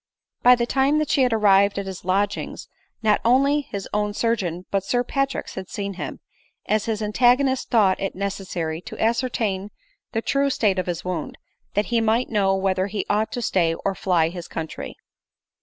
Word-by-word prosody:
By 250 +1 +7
the 235 -1 0
time 270 +4 +2
that 305 -1 0
she 275 - +3
had 250 -1 +3
arrived 200 -2 +4
at 200 - -2
his 190 -1 -7
lodgings, 195 +3 -1 0.4
not 215 -1 +3
only 275 +5 +4
his 200 -8 -6
own 210 0 0
surgeon 185 -7 -1
but 195 -1 +1
Sir 245 +5 0
Patrick's 275 +1 -2
had 190 -1 -7
seen 200 -1 -4
him; 185 - -6 0.4
as 215 0 +1
his 220 -1 -2
antagonist 250 +5 +2
thought 205 -5 +3
it 195 - -3
necessary 185 -4 -3
to - - -9
ascertain 225 -4 0 0.4
the 225 0 -2
true 280 0 +1
state 205 -7 +1
of 185 - -2
his 175 -1 -3
wound, 180 -4 -4 0.4
that 205 +1 +2
he 230 - +3
might 225 +3 +1
know 195 -3 +2
whether 190 0 0
he 205 0 -3
ought 215 +1 +1
to 245 - -3
stay, 170 -5 +1
or 195 +3 -2
fly 175 -4 +1
his 175 0 -8
country. 160 -1 -6
205 Hz, 185 wpm, -23 LUFS, 190-235 Hz, 0.4 s, By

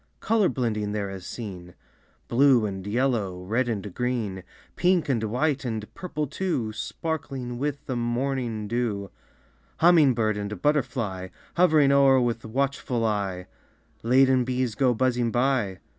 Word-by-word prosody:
Color 215 -4 +2
blending 110 -5 -2
there 100 -2 -2
is 95 -2 -8
seen, 90 -6 -8 0.5
Blue 125 -2 +4
and 95 -1 -5
yellow, 105 -6 0
red 120 +6 0
and 105 -4 -4
green, 115 -6 -2 0.3
Pink 180 -3 +2
and 115 -5 +1
white 140 +6 0
and 110 -4 -4
purple 155 -5 -4
too, 140 - -2
Sparkling 130 0 -4
with 145 0 -3
the 130 - -3
morning 120 -2 -2
dew 105 -4 -2 0.7
Humming 160 -6 +5
bird 110 -2 +1
and 105 -1 -4
butterfly 120 -9 -1 0.3
Hovering 155 -5 +5
o'er 135 -1 +5
with 120 -2 -1
watchful 130 0 -1
eye. 100 -4 -1 0.6
Laden 130 +2 +4
bees 125 -1 -1
go 125 0 +2
buzzing 120 0 +1
by. 120 -5 +1
120 Hz, 135 wpm, -26 LUFS, 105-135 Hz, 0.7 s, Humming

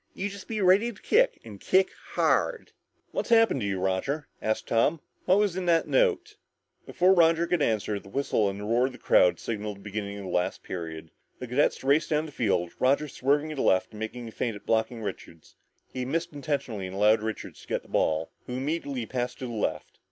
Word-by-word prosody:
You 200 - -2
just 200 -1 -10
be 220 -2 -2
ready 195 +6 +4
to 205 - -15
kick - - +2
and 105 -3 -10
kick 190 0 +3 0.2
hard!" 480 -2 +1 0.4
"What's - - -3
happened 225 - +4
to 100 - -1
you, 95 -2 -1
Roger?" 95 +11 -1
asked 110 0 -1
Tom. 145 +8 +2 0.3
"What 185 - +4
was 205 -4 +2
in 185 -1 -3
that 165 -1 +3
note?" 435 -3 +1 0.5
Before 185 +2 +4
Roger 165 -1 +4
could 170 -2 0
answer, 105 -4 0
the 95 - -15
whistle 110 -5 +1
and 100 +1 -6
the - - -6
roar 120 +4 +2
from 135 - -8
the - - -11
crowd 90 - +4
signaled 105 -2 -4
the - - -16
beginning 100 0 -5
of 100 - -7
the 95 - -6
last 90 - -1
period. 80 -3 -6 0.3
The 125 - -6
cadets 125 +4 +1
raced 140 +4 +3
down 155 0 +1
the 155 - -9
field, 95 -9 0
Roger 140 +4 +2
swerving 145 +3 0
to 155 - -5
the - - 0
left 95 0 +2
and 105 - -10
making 115 +2 -5
a - - -8
feint 115 0 -2
at 100 - -12
blocking 110 +1 0
Richards. 85 -5 -8 0.4
He 130 - -3
missed 165 +6 -2
intentionally 140 -9 -3
and 95 - -8
allowed 105 +2 +4
Richards 110 0 -5
to - - -16
get - - -2
the - - -19
ball, 80 +1 0 0.2
who 125 - -5
immediately 140 -2 -2
passed 125 +1 -3
to 130 - -6
the 120 - -5
left. 110 - -3
125 Hz, 220 wpm, -27 LUFS, 105-165 Hz, 0.5 s, ready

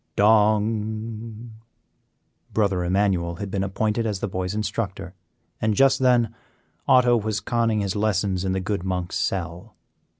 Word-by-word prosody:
dong! 110 +2 +1 1.0
Brother 100 -4 +1
Emmanuel 90 -2 +1
had 95 +2 -6
been 95 -1 -1
appointed 110 +4 -1
as 105 -3 -2
the - - -2
boy's 95 0 -3
instructor, 100 -3 -3 0.5
and 110 -1 +1
just 135 +2 +4
then 125 -3 +3 0.5
Otto 125 -1 +5
was 110 -2 -1
conning 115 -1 0
his 100 0 -2
lessons 100 -3 0
in 95 -1 0
the 95 - 0
good 100 +1 -2
monk's 90 -1 -2
cell. 90 +3 -3
105 Hz, 135 wpm, -24 LUFS, 95-110 Hz, 1.0 s, Otto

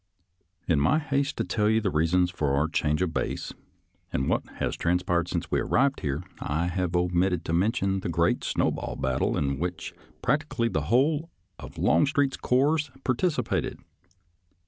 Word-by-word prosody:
In 80 -4 +3
my 105 - +3
haste 140 -2 -1
to - - 0
tell 105 -2 +1
you 110 0 +3
the 105 -4 -1
reasons 90 +3 +2
for 75 -6 0
our 75 +3 +2
change 75 +1 0
of 85 -3 -2
base - - -3 0.6
and 65 - -1
what - - +1
has - - -2
transpired 90 0 0
since 85 -2 -3
we - - +2
arrived 135 +1 +2
here, 75 +3 -2 0.2
I 80 +4 -1
have 90 -1 -1
omitted 90 0 +1
to 80 - -2
mention 95 +1 +1
the - - -4
great - - +1
snowball - - -1
battle 65 0 0
in 70 -2 -1
which 90 0 -4 0.3
practically 150 -6 0
the 80 -7 -1
whole 145 +7 +2 0.3
of - - -10
Longstreet's 140 -1 +2
corps 145 +4 +2
participated. 130 0 0
90 Hz, 160 wpm, -27 LUFS, 80-130 Hz, 0.6 s, In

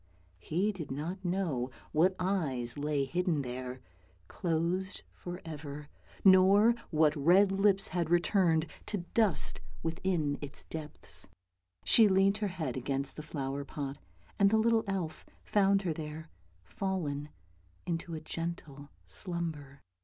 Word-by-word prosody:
He 180 - 0
did 170 -8 -7
not 165 +8 -4
know 175 -9 -1 0.2
what 180 +5 +3
eyes 150 -11 0
lay 145 -1 0
hidden 170 0 0
there, 125 0 -5 0.5
closed 175 - -1
for 175 0 -7
ever, 150 -2 -7 0.4
nor 195 +4 +7 0.2
what 155 -2 +3
red 180 +7 +5
lips 195 0 +3
had 170 -3 -1
returned 170 -2 +3 0.2
to 195 -5 -3
dust 215 -7 +2 0.2
within 165 -3 0
its 145 -1 -7
depths. 155 -2 -7 0.6
She 225 -2 +7
leant 195 +1 +3
her 210 - 0
head 160 -9 -3
against 135 +1 -2
the - - -6
flower 140 -2 -4
pot, 140 -1 -5 0.4
and 200 -1 +6
the 220 - +3
little 225 0 +3
elf 185 -5 -3 0.2
found 200 -1 +3
her 170 -4 0
there, 155 +1 -7 0.3
fallen 150 - -3 0.6
into 170 -1 -3
a - - -4
gentle 155 -3 -5 0.2
slumber. 160 -6 -5
165 Hz, 130 wpm, -32 LUFS, 145-190 Hz, 0.6 s, nor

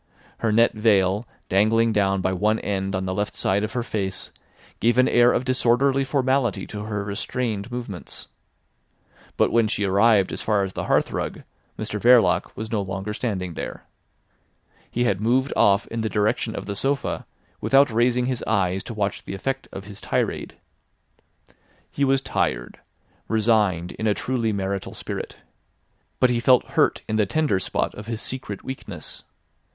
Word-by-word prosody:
Her 115 - +1
net 115 +2 +4
veil 105 -1 +2 0.2
dangling 110 +4 +3
down 95 -2 +2
by 95 0 0
one 105 +4 +2
end 95 -1 -2
on 95 0 -2
the 95 - -2
left 105 +2 -2
side 100 +2 +1
of 105 +1 -3
her 120 - -1
face 100 -5 -3 0.5
gave 120 +2 +2
an 130 - +5
air 120 0 +5
of 130 - 0
disorderly 130 +2 +2
formality 130 -6 0
to 105 0 -6
her 105 -2 -3
restrained 105 +2 -3
movements. 120 -7 -6 1.1
But - - +3
when 115 -1 +3
she 105 -1 -1
arrived 100 0 +4
as - - -3
far 105 -2 +1
as 95 -1 -4
the - - -4
hearthrug, - - 0 0.3
Mr 105 -1 -4
Verloc 115 -7 +5
was 110 +1 -5
no 110 -3 +1
longer 95 +2 -4
standing 95 -7 -3
there. - - -6 1.1
He 120 - 0
had 100 -5 +1
moved 130 +5 +2
off 100 +2 +4
in 115 0 -3
the 110 - -1
direction 105 0 0
of - - -5
the 100 0 -4
sofa, 140 +6 -1 0.3
without 135 -1 +4
raising 120 +2 +2
his 125 -2 -2
eyes 95 -3 +1
to 115 - -6
watch 100 -1 -2
the - - -5
effect 135 +7 -3
of 95 - -7
his 100 0 -10
tirade. - - -2 1.4
He 140 - -1
was 135 0 +3
tired, - - -2 0.5
resigned 105 -6 +2
in 110 - -3
a 105 - +2
truly 120 -4 -1
marital 100 -1 -3
spirit. - - -5 0.8
But 125 - +4
he 120 - +1
felt 125 +1 +4
hurt - - +2
in 110 - 0
the 105 -2 +2
tender 150 -7 +1
spot - - -1
of 105 +1 -9
his 115 -2 -3
secret 125 -7 -5
weakness. 130 0 -7
110 Hz, 165 wpm, -24 LUFS, 100-120 Hz, 1.4 s, an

